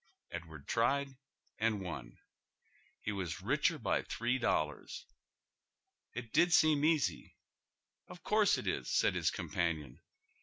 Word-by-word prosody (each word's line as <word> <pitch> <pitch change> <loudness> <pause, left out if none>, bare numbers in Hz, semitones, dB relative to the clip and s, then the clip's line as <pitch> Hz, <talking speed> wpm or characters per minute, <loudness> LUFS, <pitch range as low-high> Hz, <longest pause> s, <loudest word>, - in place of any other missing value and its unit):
Edward 80 -4 -8
tried 135 +4 +1 0.4
and 110 -1 +1
won. 80 -10 -7 0.9
He 105 - -1
was 95 -2 -4
richer 145 - +2
by 120 - 0
three 120 +3 -1
dollars! 75 - -1 1.1
It 120 -1 -6
did 170 +4 +4
seem 155 -3 +5
easy, 150 - +1 0.4
' - - -56
Of 180 - -11
course 210 -1 +3
it - - -5
is,' - - -2
said - - +3
his - - +1
companion. 80 -7 -2
115 Hz, 125 wpm, -34 LUFS, 85-145 Hz, 1.1 s, seem